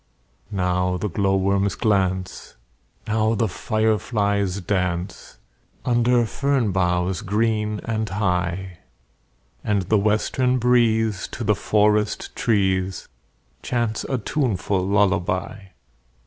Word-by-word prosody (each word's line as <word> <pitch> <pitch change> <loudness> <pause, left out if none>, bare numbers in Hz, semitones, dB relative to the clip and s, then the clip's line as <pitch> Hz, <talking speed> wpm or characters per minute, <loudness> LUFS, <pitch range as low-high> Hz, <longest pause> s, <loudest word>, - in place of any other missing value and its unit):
Now 90 -2 0
the 105 +4 -3
glowworms 95 0 +1
glance, 95 -2 -1 0.5
Now 110 +1 +1
the 110 +1 +1
fireflies 100 -2 0
dance, 90 -4 -3 0.5
Under 120 0 +3
fern 135 -2 0
boughs 90 0 0
green 105 +1 0
and 110 -2 -2
high; 90 -2 -2 0.8
And 100 -2 0
the 105 +4 +2
western 110 +5 +1
breeze 110 -4 +2
To - - -4
the - - +3
forest 105 0 +1
trees 95 -4 0 0.5
Chants 120 -3 -1
a 130 - -1
tuneful 105 - -1
lullaby. 100 0 0
105 Hz, 95 wpm, -22 LUFS, 95-110 Hz, 0.8 s, Under